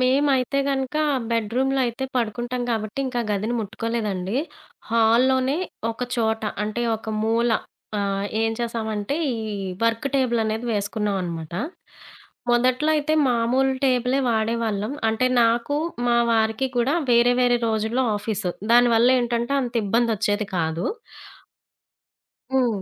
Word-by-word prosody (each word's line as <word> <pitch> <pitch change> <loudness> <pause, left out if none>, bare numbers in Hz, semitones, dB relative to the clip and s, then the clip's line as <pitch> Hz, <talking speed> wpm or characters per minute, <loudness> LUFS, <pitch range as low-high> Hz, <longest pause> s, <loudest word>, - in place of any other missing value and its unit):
మేమైతే 265 0 +2
గనుక 270 +1 -1 0.3
బెడ్‌‌‌‌‌‌‌‌‌‌‌‌రూంలో 245 +4 0
అయితే 240 +3 -3
పడుకుంటాం 240 +1 -2
గాబట్టి. 215 +2 -3
ఇంక 255 - -4
ఆ 225 - -6
గదిని 210 +4 -1
ముట్టుకోలేదండి. 215 -2 -3 0.5
హాల్‌ 230 +2 +4
లోనే 260 +2 +1 0.3
ఒక 230 +2 -6
చోట 220 -1 0 0.2
అంటే 215 +3 -3
ఒక 220 - -10
మూల 230 +2 +2 0.5
ఆహ్, 200 0 -1 0.2
ఏం 225 - +1
చేసామంటే 225 +1 -2 0.2
ఈ - - -2 0.5
వర్క్‌టేబుల్ 245 +1 +1
అనేది 220 +2 -2
వేసుకున్నాం 205 0 -1
అనమాట. 165 -2 -5 1.0
మొదట్లో 255 +5 +2
అయితే 300 +1 0 0.2
మామూలు 250 +3 +2
టేబుల్ 250 0 +2
వాడేవాళ్ళం. 220 0 -1 0.2
అంటే 225 +3 +1 0.2
నాకు 235 +5 +1 0.3
మా 240 - +3 0.2
వారికి 220 +3 +1
కూడా 245 +5 +2 0.2
వేరే 240 +1 +5
వేరే 245 -1 +4
రోజుల్లో 220 +3 0
ఆఫీసు 205 -3 -2 0.2
దానివల్ల 240 0 +5
ఏంటంటే 240 +2 -1
అంత 245 -2 -4
ఇబ్బంది 230 +3 +2
వచ్చేది 205 +2 0
గాదు. 165 0 -1 1.7
హ్మ్. 245 -6 +1
230 Hz, 120 wpm, -23 LUFS, 220-250 Hz, 1.7 s, వేరే